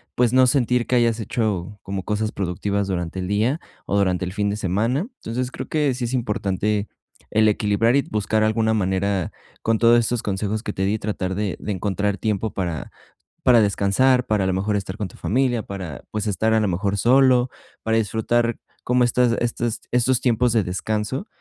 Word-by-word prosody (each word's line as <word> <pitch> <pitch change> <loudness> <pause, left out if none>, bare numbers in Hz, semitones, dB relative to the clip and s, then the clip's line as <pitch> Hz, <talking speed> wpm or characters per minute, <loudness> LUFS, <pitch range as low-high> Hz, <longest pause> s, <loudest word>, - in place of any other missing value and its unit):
pues, 125 -1 +2
no 130 0 +6
sentir 125 -2 +2
que 125 - 0
hayas 115 -1 +2
hecho 105 -3 -2
como 95 -1 -4
cosas 105 +1 -2
productivas 100 +2 -2
durante 90 0 -3
el 90 - -4
día, 115 +10 +1 0.2
o 100 - 0
durante 95 -2 +1
el 90 - -5
fin 105 -1 0
de 105 - -2
semana, 115 - 0 0.2
entonces, 125 +3 -2
creo - - -7
que 150 -4 +1
sí 125 - -5
es 120 - -2
importante 105 -3 -1 0.4
el 110 0 +4
equilibrar 105 +3 +2
y 140 - +4
buscar 110 -2 0
alguna 110 0 +2
manera 95 -2 0 0.3
con 115 0 +1
todos 120 0 +6
estos 120 0 0
consejos 105 +2 -2
que 105 - -4
te 95 - -2
di, 105 +2 0
tratar 95 -3 -3
de 100 -3 -2
de 105 - -5
encontrar 100 +1 -1
tiempo 110 +1 -2
para 85 -5 -3 0.5
para 120 -3 +6
descansar, 115 +6 +2
para 105 -3 +1
a - - 0
lo - - +1
mejor 100 +3 0
estar 95 0 -4
con 105 - -3
tu - - -16
familia, 120 -1 0
para, 90 -8 -7
pues, 105 0 -2
estar 110 +3 +1
a 110 - +4
lo 105 - +1
mejor 100 +2 -1
solo, 125 +2 +4 0.3
para 110 0 0
disfrutar 115 +2 +1 0.3
como 125 0 +3
estas 120 -1 +2
estas 120 -1 -1
estos 125 +1 +2
tiempos 125 -1 +2
de 110 -2 +2
descanso, 105 - -3
110 Hz, 195 wpm, -22 LUFS, 100-120 Hz, 0.5 s, no